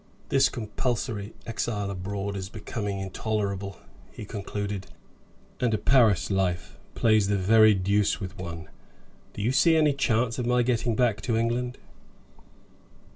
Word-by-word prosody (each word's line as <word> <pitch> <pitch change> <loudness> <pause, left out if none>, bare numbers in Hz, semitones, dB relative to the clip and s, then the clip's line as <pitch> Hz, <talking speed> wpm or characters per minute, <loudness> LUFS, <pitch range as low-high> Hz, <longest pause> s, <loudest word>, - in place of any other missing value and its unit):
"This 135 0 +4
compulsory 110 -2 -3
exile 105 -3 -2
abroad 100 +1 -4
is 95 -1 -5
becoming 105 -2 -4
intolerable," 100 0 -3 0.3
he 105 - -8
concluded; 100 -1 -4 0.7
"and 120 -3 +1
a - - 0
Paris 110 -3 +3
life 95 -3 -1 0.2
plays 110 -3 +3
the 100 0 +1
very 110 +2 +6
deuce 100 +3 +1
with 95 -2 -6
one. 85 -3 -6 0.7
Do 100 - -5
you 115 - +2
see 160 +5 +4
any 150 -2 +4
chance 120 -3 0
of 120 - -1
my 125 0 +3
getting 120 -1 0
back 110 -4 +1
to 115 0 0
England?" 120 +2 -1
105 Hz, 135 wpm, -26 LUFS, 100-120 Hz, 0.7 s, very